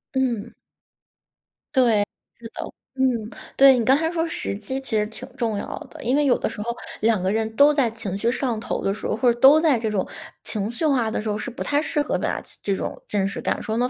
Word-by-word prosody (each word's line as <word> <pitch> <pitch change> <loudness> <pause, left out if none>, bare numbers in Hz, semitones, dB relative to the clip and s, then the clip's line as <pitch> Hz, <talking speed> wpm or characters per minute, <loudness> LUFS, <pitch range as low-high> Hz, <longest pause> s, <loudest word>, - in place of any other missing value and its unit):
嗯。 235 -4 -1 1.2
对， 230 -6 +4 0.3
是 230 - -8
的。 - - -5 0.3
嗯， 265 - 0 0.5
对， 270 -1 +8
你 230 - +1
刚 265 +4 +5
才 320 +2 0
说 330 -1 -1
时 200 - -3
机 220 +6 -4
其 260 -4 -3
实 210 0 +2
挺 240 +4 -9
重 230 -5 -1
要 - - -4 0.2
的。 - - -11
因 250 +3 +2
为 295 - +3
有 250 - +4
的 - - -1
时 210 - -6
候 235 +2 -3 0.3
2 220 -3 +3
个 190 +1 +1
人 220 0 0
都 290 +1 +6
在 270 -5 +2
情 215 -4 -4
绪 230 +4 +1
上 245 -4 -1
头 - - -3
的 195 - +1
时 220 - -5
候， - - 0
或 240 0 +4
者 240 - -13
都 280 +4 +8
在 305 -7 +3
这 220 -1 -1
种 200 -3 -1 0.4
情 210 -1 -2
绪 240 +7 -2
化 255 -7 +2
的 - - -2
时 215 - -4
候， 210 - 0
是 220 - -4
不 245 - -5
太 290 +1 +1
适 300 - -1
合 - - -1
把 - - -1 0.2
这 200 - 0
种 - - -5
真 195 -2 0
实 - - -5
感 - - -1
受 220 - -2
呢， 250 +1 +1
235 Hz, 260 characters per minute, -23 LUFS, 215-265 Hz, 1.2 s, 对